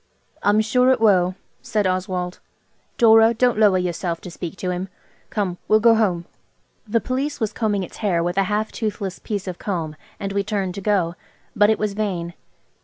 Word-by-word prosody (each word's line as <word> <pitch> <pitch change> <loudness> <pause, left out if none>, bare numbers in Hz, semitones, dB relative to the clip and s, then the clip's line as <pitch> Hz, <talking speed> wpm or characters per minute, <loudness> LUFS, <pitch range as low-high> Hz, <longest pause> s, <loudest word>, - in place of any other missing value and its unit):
"I'm 205 +1 +3
sure 250 +4 +3
it 260 -1 +3
will," 185 -4 +3 0.3
said 210 -2 -1
Oswald. 185 -1 -2 0.6
"Dora, 225 0 +6
don't 245 -1 +2
lower 205 -4 +5
yourself 175 -1 -2
to 180 - -8
speak 175 +1 -7
to 180 - -2
him. 180 +2 -4 0.4
Come, 185 -4 -2
we'll 215 - +5
go 230 +1 +6
home." 190 -7 +1 0.6
The 230 +2 +2
Police 265 +7 -2
was 220 -3 -1
combing 205 -4 0
its - - -9
hair 180 -6 +1
with 175 +2 0
a 195 - +3
half 215 +1 -1
toothless 205 -4 -4
piece 205 -3 -4
of 180 -1 -5
comb, 165 -6 -3 0.2
and 195 -1 -4
we 200 0 +1
turned 200 -3 -2
to 200 - -6
go. 190 -5 +1 0.4
But 205 -1 +5
it 220 - +3
was 210 -1 -1
vain. 185 -5 -3
200 Hz, 185 wpm, -22 LUFS, 180-220 Hz, 0.6 s, Dora